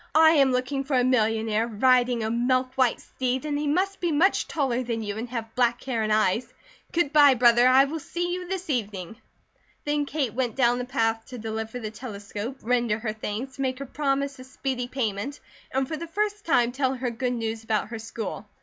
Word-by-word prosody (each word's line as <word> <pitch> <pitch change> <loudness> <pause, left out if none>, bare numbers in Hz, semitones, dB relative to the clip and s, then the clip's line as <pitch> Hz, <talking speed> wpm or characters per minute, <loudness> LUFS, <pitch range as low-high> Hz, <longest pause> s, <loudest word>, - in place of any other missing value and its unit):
"I 315 0 +8
am 275 -4 +4
looking 255 +2 -1
for 270 0 -1
a 250 - +4
millionaire, 225 -2 +2
riding 245 +1 +3
a 220 - -1
milk 255 +2 +1
white 255 -3 +2
steed, 255 +2 -3
and 295 -1 -1
he 295 - -1
must 385 +6 0
be 345 -2 0
much 335 +7 +3
taller 260 -5 0
than 230 -2 -3
you 205 -1 -4
and 230 +3 -5
have 230 -2 -5
black 240 -1 +1
hair 245 -4 -1
and 215 0 0
eyes. 215 +2 +2 0.4
Good 330 -4 +1
bye, 290 -3 +7
brother! 240 0 +5
I 260 +2 +6
will 315 +3 -4
see 350 +4 -3
you 360 0 -4
this 380 0 -4
evening." 210 -5 -3 0.7
Then 295 -1 0
Kate 280 -7 -1
went 245 -2 -1
down 245 -2 +3
the 250 - -3
path 225 -3 0
to 250 - -8
deliver 220 +1 -4
the 215 -3 -5
telescope, 210 +1 -6
render 240 -2 +1
her 215 -1 -3
thanks, 220 +5 -5
make 260 -1 -1
her 275 - -6
promise 275 0 -1
of 255 - -11
speedy 260 -2 -3
payment, 245 +1 -3 0.3
and 265 0 0
for 315 - -4
the 335 +2 -6
first 415 +3 -2
time 245 -6 +3
tell 265 0 0
her 250 -1 -2
good 250 +2 -2
news 225 -1 -3
about 220 -1 -1
her 225 -1 -5
school. 220 -1 -6
250 Hz, 210 wpm, -26 LUFS, 225-275 Hz, 0.7 s, I